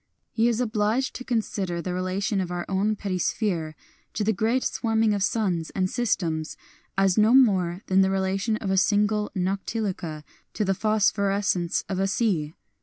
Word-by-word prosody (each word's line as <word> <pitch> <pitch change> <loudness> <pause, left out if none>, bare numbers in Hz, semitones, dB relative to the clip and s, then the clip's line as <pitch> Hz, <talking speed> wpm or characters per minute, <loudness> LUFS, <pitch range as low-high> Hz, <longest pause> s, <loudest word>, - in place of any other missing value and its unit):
He 225 +1 +2
is 235 -1 +1
obliged 225 +2 0
to 255 - -7
consider 205 -7 -2
the 180 +1 -3
relation 190 +3 -1
of 180 - -4
our 175 -1 -3
own 200 +3 0
petty 195 -3 -3
sphere 165 -5 -1 0.4
to 210 - 0
the 220 +2 +2
great 225 +6 +1
swarming 225 -2 +1
of 200 - -1
suns 190 -6 0
and 185 -1 0
systems 170 -10 -1 0.4
as 195 0 +3
no 220 +4 +5
more 190 -8 +3
than 190 0 +3
the 190 - +3
relation 195 +3 0
of 195 -3 -3
a 190 - +1
single 210 +1 +2
noctiluca 185 -4 -3 0.3
to 210 - 0
the 195 - +2
phosphorescence 200 -3 +1
of 190 -1 -3
a 195 - +2
sea. 180 -8 0
195 Hz, 170 wpm, -25 LUFS, 185-215 Hz, 0.4 s, no